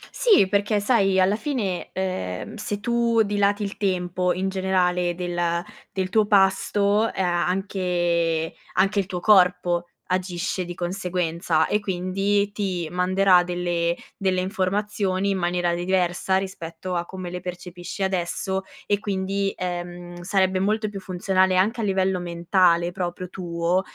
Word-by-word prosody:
Sì 420 - +5
perché 205 +2 +1
sai, 200 -3 +3
alla 190 +2 +4
fine, 220 - -2
ehm, 185 - -3
se 210 -1 -4
tu 235 0 +2
dilati 205 0 +1
il 200 0 -5
tempo 180 -3 0
in 190 +2 -1
generale 180 -2 +1
del 175 -1 -1 0.3
del 190 -1 -2
tuo 215 +1 +3
pasto, 205 +2 +3
ea 175 -2 0
anche 175 -4 0 0.2
anche 195 +2 +2
il 190 - -1
tuo 180 - -4
corpo 180 -3 +3 0.2
agisce 185 0 -2
di 175 0 -7
conseguenza, 175 -2 0
e 210 - +1
quindi 195 +1 0
ti 185 -5 -2
manderà 185 +1 +4
delle 175 -1 -1 0.2
delle 185 -2 0
informazioni 195 0 -1
in 195 - 0
maniera 175 0 0
diversa, 180 +1 +1
rispetto 185 -2 -5
a 175 -1 -1
come 185 -1 -7
le 180 - -4
percepisci 180 +1 -6
adesso 190 +1 -1 0.2
e 205 0 +1
quindi, 195 0 -1
ehm, 175 -1 -5
sarebbe 190 0 +1
molto 215 +2 +1
più 200 -1 -6
funzionale, 185 0 +1
anche 220 +6 +2
a - - -1
livello 190 -2 +1
mentale 175 0 +2
proprio 180 0 -4
tuo, 175 0 -1
185 Hz, 140 wpm, -24 LUFS, 175-195 Hz, 0.3 s, Sì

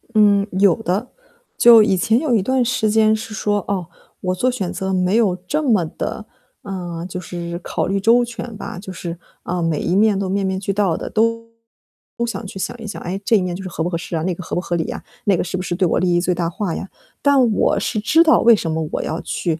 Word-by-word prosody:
嗯， 205 -1 +4
有 195 -4 +5
的。 195 +8 -1 0.5
就 235 -2 +8
以 195 -3 +2
前 220 +6 +2
有 295 -4 0
一 210 - +3
段 260 +5 +1
时 225 -3 0
间 220 0 +4
是 220 0 -7
说， 205 -2 -1
哦， 190 -4 -2 0.3
我 185 0 -1
做 255 +7 +1
选 200 -8 -3
择 190 0 -3
没 185 +1 +1
有 200 -6 +3
这 300 +10 0
么 225 - +2
的， 215 +6 -5 0.4
啊， 175 -4 -5
就 180 0 -5
是 170 -1 -6
考 - - -2
虑 195 +1 0
周 235 +4 +4
全 240 -1 -6
吧， 185 - -7
就 190 -1 -8
是， 170 -1 -6 0.2
呃， 175 0 -2
每 165 -3 0
一 175 - -1
面 210 -1 +4
都 195 -1 -2
面 195 0 0
面 190 0 -1
俱 195 0 -2
到 195 -4 +1
的， - - -5
都 230 +1 0 0.8
想 230 -2 -5
去 190 - -9
想 190 - -3
一 225 - -8
想， 205 - -6
哎， 185 +2 -4
这 230 - +4
一 200 - +3
面 180 -1 -2
就 190 - -7
是 190 - -6
合 165 - -3
不 175 - -1
合 170 - -2
适 170 +1 -6
啊， 160 - -1
那 185 +1 0
个 175 - -8
合 - - -5
不 175 - 0
合 175 - -2
理 160 - -2
啊， - - -6 0.2
那 200 -3 +4
个 - - 0
是 180 +1 -4
不 185 - -3
是 175 - -2
对 185 +1 +2
我 - - +1
利 185 - +1
益 175 - +2
最 180 +1 +1
大 170 -1 -1
化 180 0 -3
呀？ - - -5 0.3
但 270 -5 +4
我 205 - +2
是 215 - -1
知 320 +10 +4
道 320 - +5
为 235 -1 +6
什 170 -5 -3
么 160 0 -2
我 - - -1
要 160 - -3
去 165 -3 -2
195 Hz, 280 characters per minute, -20 LUFS, 180-220 Hz, 0.8 s, 就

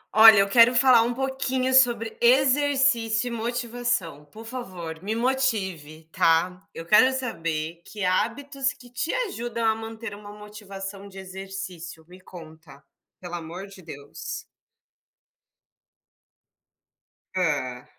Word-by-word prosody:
Olha, 220 -1 +9
eu 195 0 +4
quero 235 +3 +5
falar 250 -1 +6
um 235 +1 0
pouquinho 265 0 -1
sobre 240 -4 +4
exercício 260 -3 +3
e - - -7
motivação, 235 -8 -3
por 220 +10 -13
favor, 185 -10 -7
me 210 +4 -3
motive, 195 - -1
tá? 170 +3 +1
Eu 165 - -9
quero 235 +8 +5
saber 165 -9 -4
que 210 -2 -7
hábitos 270 +8 -1
que 245 -1 -17
te 250 +7 -2
ajudam 240 - -3
a 220 - +4
manter 225 -1 -7
uma 205 0 -11
motivação 200 -1 -9
de 195 - -14
exercício. 190 -3 -8
Me 180 +1 -15
conta, 160 -5 -14 0.4
pelo 180 -1 -9
amor 175 +2 -6
de 195 -1 -14
Deus. 145 -4 -8 2.9
Hã. 145 -9 -1
210 Hz, 120 wpm, -25 LUFS, 175-245 Hz, 2.9 s, Olha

